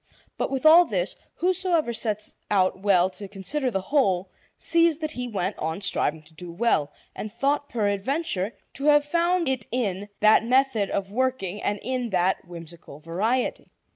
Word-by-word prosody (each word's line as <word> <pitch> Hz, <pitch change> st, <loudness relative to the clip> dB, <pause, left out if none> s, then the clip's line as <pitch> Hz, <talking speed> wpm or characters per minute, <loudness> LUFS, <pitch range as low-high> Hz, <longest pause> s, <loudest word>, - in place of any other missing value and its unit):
But -, -, -2 dB
with 270 Hz, +2 st, -3 dB
all 335 Hz, +3 st, +9 dB
this, -, -, -1 dB, 0.2 s
whosoever 355 Hz, -7 st, +1 dB
sets 215 Hz, -2 st, -3 dB
out 190 Hz, -2 st, +2 dB
well 190 Hz, -3 st, +4 dB
to 200 Hz, +2 st, -9 dB
consider 210 Hz, +8 st, -2 dB
the 195 Hz, -5 st, -2 dB
whole 190 Hz, -6 st, +1 dB, 0.3 s
sees 335 Hz, -2 st, +3 dB
that 310 Hz, -1 st, -4 dB
he 250 Hz, -4 st, -4 dB
went 195 Hz, -3 st, -3 dB
on 160 Hz, +3 st, -2 dB
striving 160 Hz, -5 st, 0 dB
to 155 Hz, +1 st, -19 dB
do 170 Hz, +2 st, -9 dB
well, 170 Hz, -6 st, +1 dB, 0.2 s
and 215 Hz, -, -6 dB
thought 280 Hz, +5 st, 0 dB
peradventure 210 Hz, -, -1 dB, 0.2 s
to 275 Hz, -, -5 dB
have 295 Hz, -1 st, +5 dB
found 340 Hz, +3 st, +1 dB
it 260 Hz, -5 st, -1 dB
in 205 Hz, -5 st, -2 dB
that 215 Hz, +1 st, +5 dB
method 250 Hz, -4 st, +2 dB
of 195 Hz, 0 st, -3 dB
working 230 Hz, -5 st, -1 dB
and 205 Hz, 0 st, -1 dB
in 250 Hz, 0 st, -2 dB
that 185 Hz, -1 st, 0 dB
whimsical 170 Hz, -3 st, -10 dB
variety. 205 Hz, +11 st, -1 dB
215 Hz, 165 wpm, -25 LUFS, 190-275 Hz, 0.3 s, all